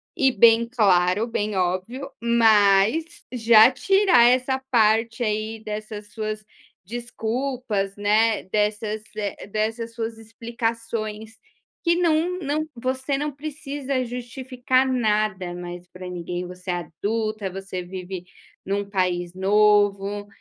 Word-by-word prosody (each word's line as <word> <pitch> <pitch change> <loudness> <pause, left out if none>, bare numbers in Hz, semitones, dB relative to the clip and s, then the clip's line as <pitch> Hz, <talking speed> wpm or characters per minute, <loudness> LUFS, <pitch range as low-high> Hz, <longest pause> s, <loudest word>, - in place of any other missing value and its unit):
e 265 -1 +3
bem 230 +1 +5
claro, 205 -3 +2
bem 210 -3 -2
óbvio, 185 +10 -2
mas 220 +2 +4 0.3
já 225 -1 +7
tirar 375 0 +4
essa 255 +1 +2
parte 225 0 +3
aí 215 +1 -2
dessas 210 -1 -6
suas 215 -1 -4 0.4
desculpas, 235 -2 -3
né, 215 +2 +2
dessas, 210 +2 -1 0.2
eh, 205 -2 -4
dessas 225 +2 -2
suas 225 -1 -4
explicações 225 -1 -4 0.5
que 340 0 +3
não 350 +1 +1
não 305 0 -1
Você 260 +3 -2
não 295 +1 -2
precisa 280 -3 -4
justificar 255 +1 -1
nada 215 -7 0
mais 175 0 -7
pra 185 0 -9
ninguém, 180 0 -5
você 180 +1 -6
é - - 0 0.3
adulta, 215 -1 -1
você 190 -1 -6
vive 180 0 -7 0.4
num 200 +1 -2
país 180 -3 -1
novo 205 +1 +2
220 Hz, 115 wpm, -23 LUFS, 200-245 Hz, 0.5 s, já